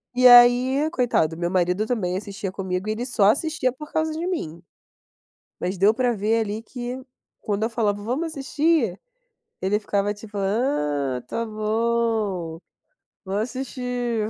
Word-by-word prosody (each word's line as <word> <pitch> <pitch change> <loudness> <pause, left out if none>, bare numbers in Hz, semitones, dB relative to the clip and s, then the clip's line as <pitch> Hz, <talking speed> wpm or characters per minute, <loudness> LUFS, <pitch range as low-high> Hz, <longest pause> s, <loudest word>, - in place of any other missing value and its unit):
e 255 0 +3
aí, 250 +4 +7
coitado, 230 - +1
meu 175 0 -1
marido 180 +3 +1
também 190 -7 -1
assistia 200 0 -5
comigo 190 0 -3
e - - +1
ele 240 +3 -4
só 235 -5 +2
assistia 275 +3 +2
por 300 +3 -11
causa 315 0 0
de 330 +3 -3
mim. 170 - -4 1.0
Mas 180 +2 -2
deu 205 +4 +5
para 245 0 +1
ver 215 +3 +1
ali 215 +1 -3
que, 250 +1 -6 0.4
quando 210 0 -1
eu 225 - +1
falava: 210 -3 -1
"Vamos 265 +9 -1
assistir?", 290 - 0 0.6
ele 200 +2 +1
ficava 205 0 0
tipo: 205 0 -11
"Ah, 150 - 0
está 230 - -4
bom, 215 -5 -1 0.7
vamos 200 +2 -1
assistir 245 -3 -3
220 Hz, 145 wpm, -23 LUFS, 195-250 Hz, 1.0 s, aí